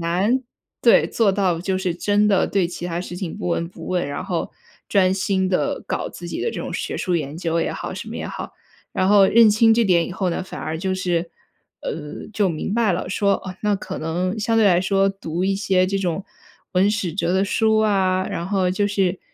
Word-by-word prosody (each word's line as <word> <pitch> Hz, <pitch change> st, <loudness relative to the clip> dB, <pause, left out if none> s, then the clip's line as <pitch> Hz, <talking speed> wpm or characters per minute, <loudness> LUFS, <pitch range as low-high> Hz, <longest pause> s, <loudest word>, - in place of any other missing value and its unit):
难 190 Hz, +10 st, +1 dB, 0.4 s
对， 235 Hz, -, +5 dB
做 220 Hz, -4 st, +2 dB
到 190 Hz, -4 st, +1 dB
就 190 Hz, +1 st, -1 dB
是 185 Hz, -3 st, -1 dB
真 205 Hz, +4 st, +2 dB
的 195 Hz, -2 st, +3 dB
对 195 Hz, -3 st, +1 dB
其 175 Hz, 0 st, -6 dB
他 170 Hz, -1 st, -3 dB
事 175 Hz, -, -7 dB
情 180 Hz, -4 st, -5 dB
不 205 Hz, -4 st, -4 dB
闻 170 Hz, 0 st, 0 dB
不 -, -, -11 dB
问， 180 Hz, -5 st, 0 dB
然 145 Hz, +5 st, -4 dB
后 175 Hz, -4 st, -2 dB, 0.4 s
专 185 Hz, -2 st, +3 dB
心 190 Hz, 0 st, 0 dB
地 185 Hz, -, 0 dB
搞 -, -, -2 dB
自 -, -, -9 dB
己 -, -, -4 dB
的 465 Hz, -, 0 dB
这 -, -, -6 dB
种 -, -, -5 dB
学 -, -, -3 dB
术 180 Hz, -, -1 dB
研 150 Hz, -1 st, -4 dB
究 165 Hz, -1 st, -1 dB
也 -, -, -1 dB
好、 -, -, -5 dB
什 -, -, -7 dB
么 -, -, -6 dB
也 -, -, -4 dB
好。 -, -, -6 dB, 0.4 s
然 185 Hz, -, +1 dB
后 200 Hz, -1 st, +6 dB
认 225 Hz, 0 st, +6 dB
清 225 Hz, +2 st, +5 dB
这 235 Hz, -, +3 dB
点 175 Hz, -3 st, +3 dB
以 -, -, -6 dB
后 185 Hz, -1 st, -1 dB
呢， 170 Hz, -, -2 dB
反 185 Hz, -, -8 dB
而 160 Hz, +1 st, -4 dB
就 190 Hz, +1 st, -1 dB
是， 175 Hz, -2 st, -1 dB, 0.5 s
呃， 150 Hz, -2 st, -6 dB
就 205 Hz, -3 st, +2 dB
明 165 Hz, +4 st, -3 dB
白 225 Hz, -4 st, +2 dB
了， 180 Hz, -, -3 dB
说， 200 Hz, 0 st, +2 dB
哦， 185 Hz, -1 st, -6 dB
那 210 Hz, -1 st, +1 dB
可 -, -, -6 dB
能 180 Hz, +6 st, -2 dB
相 225 Hz, +2 st, +1 dB
对 225 Hz, -, +5 dB
来 180 Hz, -3 st, +5 dB
说 195 Hz, +1 st, +2 dB
读 180 Hz, -2 st, -4 dB
一 195 Hz, 0 st, +1 dB
些 190 Hz, -2 st, +2 dB
这 195 Hz, +1 st, -1 dB
种 185 Hz, 0 st, -2 dB, 0.5 s
文 190 Hz, +2 st, +3 dB
史 200 Hz, -5 st, -2 dB
哲 180 Hz, 0 st, 0 dB
的 190 Hz, +1 st, +3 dB
书 220 Hz, +2 st, +2 dB
啊， 190 Hz, -3 st, +2 dB
然 170 Hz, -, -3 dB
后 190 Hz, -2 st, +1 dB
就 205 Hz, +2 st, +1 dB
是 195 Hz, -3 st, 0 dB
190 Hz, 250 characters per minute, -22 LUFS, 175-205 Hz, 0.5 s, 后